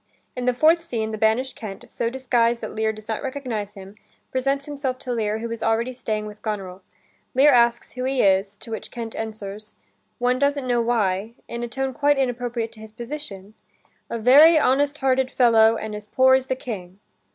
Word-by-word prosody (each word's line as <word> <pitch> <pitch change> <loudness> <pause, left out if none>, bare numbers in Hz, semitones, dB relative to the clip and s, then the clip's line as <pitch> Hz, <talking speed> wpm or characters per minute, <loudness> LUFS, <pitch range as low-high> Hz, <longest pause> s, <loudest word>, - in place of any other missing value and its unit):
In 250 -1 -3
the 250 - +3
fourth 325 +5 +4
scene, 225 -9 -3
the 215 - -4
banished 225 +5 +1
Kent, 210 +1 -8
so 235 -1 -2
disguised 240 -2 +1
that - - -6
Lear 220 0 0
does 215 0 -12
not 220 -1 -2
recognize 250 -7 -4
him, 195 0 -11 0.4
presents 275 +2 0
himself 280 -3 -3
to 255 -1 -4
Lear, 215 -2 -1
who 230 +1 -5
is 230 - -5
already 230 +3 0
staying 215 -3 -3
with 210 0 -10
Goneril. 195 -4 -5 0.5
Lear 285 +3 +6
asks 235 -2 +3
who 255 0 -4
he 265 -1 +1
is, 195 +1 +2
to 225 - -10
which 220 - -5
Kent 230 -2 -6
answers, 215 -1 -7 0.4
one 250 +1 +1
doesn't 280 -1 +1
know 245 -1 +1
why, 220 -2 0
in 235 0 -5
a 240 - -3
tone 265 +2 -3
quite 290 +2 +2
inappropriate 245 -3 -2
to 220 - -15
his 220 0 -11
position: 230 -4 -8 0.6
"A 235 - -3
very 285 +8 +7
honest 285 +1 +2
hearted 265 -2 +1
fellow 225 -3 +5
and 220 -1 -5
as 210 0 -7
poor 260 +4 +4
as 260 0 +2
the 260 - 0
King." 195 -7 -7
235 Hz, 195 wpm, -23 LUFS, 215-260 Hz, 0.6 s, very